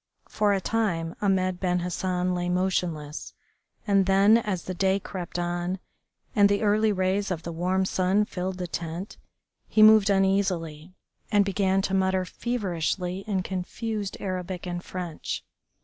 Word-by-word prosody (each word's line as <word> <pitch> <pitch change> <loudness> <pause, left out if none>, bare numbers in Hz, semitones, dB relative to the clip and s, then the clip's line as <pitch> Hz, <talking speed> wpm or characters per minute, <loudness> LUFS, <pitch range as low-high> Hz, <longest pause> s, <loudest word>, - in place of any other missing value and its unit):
For 210 -1 +1
a 200 - +2
time 175 -6 -1
Ahmed 185 -2 +1
Ben 180 -1 0
Hassan 180 +1 -1
lay 175 0 -1
motionless, 175 -5 -2 0.5
and 195 -2 +3
then, 200 +4 +6
as 195 -6 -3
the 185 - -4
day 190 +2 +2
crept 180 -3 -6
on 175 +1 -2 0.6
and 200 -1 +6
the 205 +1 +1
early 215 +1 +3
rays 190 +1 0
of 170 -3 -3
the 170 - -5
warm 185 +3 0
sun 190 +3 +2
filled 185 -1 -4
the 180 - -3
tent, 170 +3 -5 0.5
he 215 - +4
moved 215 -1 +7
uneasily, 190 -4 0 0.4
and 205 -2 +4
began 195 0 +1
to 195 - -2
mutter 190 -1 +2
feverishly 185 -5 -2
in 195 -3 0
confused 200 +3 -4
Arabic 185 -1 -4
and 175 0 -4
French. 175 -4 -5
185 Hz, 150 wpm, -26 LUFS, 180-200 Hz, 0.6 s, moved